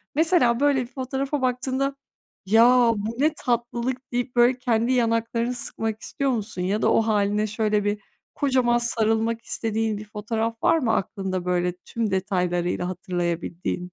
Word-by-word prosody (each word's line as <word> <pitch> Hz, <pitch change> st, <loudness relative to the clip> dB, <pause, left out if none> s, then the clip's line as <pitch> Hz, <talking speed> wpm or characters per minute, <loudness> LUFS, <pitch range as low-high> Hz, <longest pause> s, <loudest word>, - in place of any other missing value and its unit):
Mesela 310 Hz, -7 st, +3 dB
böyle 285 Hz, -2 st, +3 dB
bir 240 Hz, -, -5 dB
fotoğrafa 270 Hz, +2 st, -3 dB
baktığında, 260 Hz, +2 st, -1 dB, 0.5 s
"Ya, 235 Hz, +3 st, +5 dB
bu 215 Hz, +3 st, -4 dB
ne 305 Hz, +2 st, +3 dB
tatlılık?" 245 Hz, +2 st, -2 dB
deyip 245 Hz, +1 st, -2 dB
böyle 240 Hz, +1 st, +4 dB
kendi 235 Hz, 0 st, +1 dB
yanaklarını 230 Hz, 0 st, 0 dB
sıkmak 225 Hz, -2 st, -3 dB
istiyor 275 Hz, -1 st, -1 dB
musun? 210 Hz, -5 st, -3 dB
Ya 200 Hz, +4 st, 0 dB
da -, -, +3 dB
o -, -, +4 dB
hâline 210 Hz, -1 st, +1 dB
şöyle 210 Hz, -1 st, 0 dB
bir 205 Hz, 0 st, -1 dB, 0.4 s
kocaman 255 Hz, -4 st, +2 dB
sarılmak 225 Hz, -1 st, 0 dB
istediğin 220 Hz, -1 st, -1 dB
bir 210 Hz, -, -8 dB
fotoğraf 225 Hz, +2 st, -3 dB
var 330 Hz, -, +4 dB
mı 230 Hz, -7 st, +1 dB
aklında, 190 Hz, -3 st, -2 dB
böyle, 180 Hz, 0 st, 0 dB
tüm 215 Hz, +3 st, -4 dB
detaylarıyla 180 Hz, -2 st, -1 dB
hatırlayabildiğin? 175 Hz, -1 st, -3 dB
230 Hz, 145 wpm, -24 LUFS, 205-250 Hz, 0.5 s, Ya